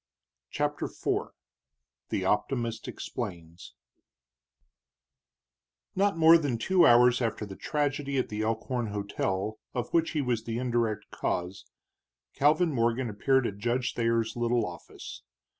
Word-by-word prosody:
CHAPTER 145 0 -1
IV - - -2 0.8
THE 95 - -1
OPTIMIST 115 +3 -1
EXPLAINS 85 -1 -7 2.2
Not 200 -2 +2
more 165 +1 +7
than 140 -6 -1
two 180 +10 +4
hours 120 +1 +6
after 110 -2 -1
the 100 -2 -9
tragedy 145 0 -1
at 130 - 0
the 105 0 -3
Elkhorn 115 +2 -1
hotel, 100 0 -2 0.2
of 125 - -3
which 165 -1 +2
he 155 - +1
was 120 -3 -1
the 115 0 -3
indirect 120 -4 -1
cause, 90 +2 -3 0.7
Calvin 155 +4 +3
Morgan 120 0 0
appeared 130 +5 +2
at 100 -2 -4
Judge 120 +3 0
Thayer's 115 -1 0
little 120 0 +1
office. 90 -1 -9
120 Hz, 125 wpm, -28 LUFS, 110-135 Hz, 2.2 s, more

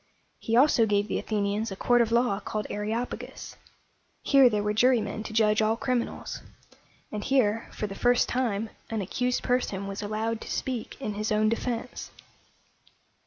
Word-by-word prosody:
He 230 - -1
also 250 -4 +5
gave 205 0 +1
the - - -1
Athenians 210 +1 -1
a - - -4
court 245 +4 +3
of 230 -1 +1
law 235 -4 +2
called 215 0 -4
A - - -3
re 210 0 -3
op´a 235 +3 -2
gus. - - -9 0.7
Here 275 -3 +6
there 210 -2 0
were 210 0 0
jurymen 220 -2 +2
to 220 - -7
judge 215 -1 +3
all 220 +1 +2
criminals; 250 -1 -2 0.7
and 210 -1 -4
here, 230 -5 +1
for - - -4
the 200 - -5
first 245 +4 +3
time, 225 -4 -1 0.2
an 225 -2 -2
accused 250 +6 -1
person 245 -6 0
was 195 0 -5
allowed 220 +2 -2
to - - -8
speak 255 -1 -4
in 215 -6 -3
his 215 +1 -3
own 215 0 +3
defense. 235 +1 -3
220 Hz, 175 wpm, -27 LUFS, 210-245 Hz, 0.7 s, Here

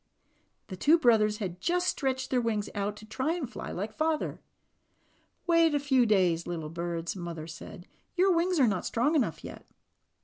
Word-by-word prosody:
The 190 - -5
two 300 - +4
brothers 220 -7 +3
had 185 -4 -5
just 355 +1 +1
stretched 260 -4 -1
their 250 -2 +2
wings 215 -3 -2
out 205 0 -2
to 215 - -11
"try 265 +10 -2
to 325 - -3
fly 245 - -7
like 205 +4 -4
father." 315 0 -1 1.0
"Wait 335 -3 +4
a - - +2
few 265 -4 +3
days, 180 -5 +2
little 165 -3 -4
birds," 170 +1 -4
Mother 170 -3 -6
said. 165 +2 -10 0.3
"Your 370 +1 +4
wings 345 0 +1
are 260 - +5
not 195 -4 0
strong 245 +7 +1
enough 295 -6 0
yet." - - -10
230 Hz, 175 wpm, -29 LUFS, 185-300 Hz, 1.0 s, are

